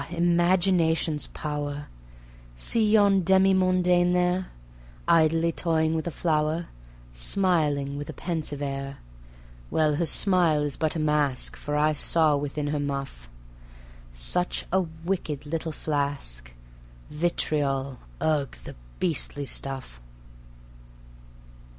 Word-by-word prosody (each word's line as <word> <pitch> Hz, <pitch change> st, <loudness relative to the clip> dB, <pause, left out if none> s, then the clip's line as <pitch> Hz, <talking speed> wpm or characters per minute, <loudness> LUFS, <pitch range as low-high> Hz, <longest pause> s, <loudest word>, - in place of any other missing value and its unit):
Imagination's 175 Hz, -2 st, +2 dB
power) 145 Hz, -1 st, -4 dB, 0.7 s
See 215 Hz, -, +2 dB
yon 200 Hz, -3 st, +5 dB
demi 190 Hz, +2 st, +4 dB
mondaine 180 Hz, -1 st, +3 dB
there, 180 Hz, +1 st, +1 dB, 0.6 s
Idly 165 Hz, 0 st, +3 dB
toying 160 Hz, -1 st, 0 dB
with 160 Hz, +1 st, -2 dB
a -, -, 0 dB
flower, 160 Hz, 0 st, -1 dB, 0.4 s
Smiling 145 Hz, -, +1 dB
with 145 Hz, -, -7 dB
a -, -, -5 dB
pensive 155 Hz, -4 st, -4 dB
air... 140 Hz, 0 st, -4 dB, 0.7 s
Well, 150 Hz, -2 st, +1 dB
her 170 Hz, -, 0 dB
smile 175 Hz, -5 st, +3 dB
is 145 Hz, -2 st, -2 dB
but 160 Hz, 0 st, -1 dB
a -, -, -1 dB
mask, 150 Hz, -4 st, +1 dB
For 150 Hz, -, -4 dB
I 155 Hz, +1 st, +3 dB
saw 155 Hz, 0 st, +3 dB
within 145 Hz, +1 st, -3 dB
her 150 Hz, 0 st, -1 dB
muff 135 Hz, -, -5 dB, 0.8 s
Such -, -, 0 dB
a 190 Hz, -, +4 dB, 0.2 s
wicked 160 Hz, -6 st, -3 dB
little 160 Hz, +2 st, -3 dB
flask: 140 Hz, -, -3 dB, 0.6 s
Vitriol 145 Hz, -5 st, -1 dB, 0.2 s
ugh! 145 Hz, -, 0 dB
the -, -, -8 dB, 0.3 s
beastly 145 Hz, -4 st, -1 dB
stuff. 130 Hz, -, -5 dB
155 Hz, 110 wpm, -26 LUFS, 145-175 Hz, 0.8 s, yon